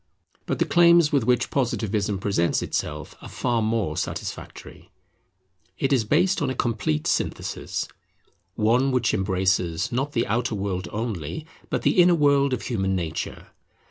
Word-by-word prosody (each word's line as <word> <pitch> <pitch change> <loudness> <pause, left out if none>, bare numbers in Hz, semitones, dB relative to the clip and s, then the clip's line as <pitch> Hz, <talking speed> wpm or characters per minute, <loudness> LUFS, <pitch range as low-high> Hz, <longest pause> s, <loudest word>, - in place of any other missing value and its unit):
But - - -1
the - - +2
claims 170 -2 +5
with 140 -6 +2
which 125 0 +1
Positivism 110 -6 0
presents 95 -3 0
itself 75 +1 -4
are - - -9
far 120 -2 -1
more 110 -7 0
satisfactory. - - -6 0.9
It 135 0 +1
is 120 -5 +2
based 185 - +2
on 140 - 0
a 130 - -3
complete 100 -11 -1
synthesis; - - -2 0.7
one 120 +5 +2
which 125 -3 +1
embraces, 95 -1 0
not 135 +4 -1
the 115 - +1
outer 120 +1 -1
world 95 -2 -3
only, 105 - -4 0.2
but - - -2
the 180 - +4
inner 175 0 +5
world 140 -3 +3
of 125 -3 -2
human 95 -6 -1
nature. 80 -3 -4
115 Hz, 145 wpm, -24 LUFS, 95-135 Hz, 0.9 s, claims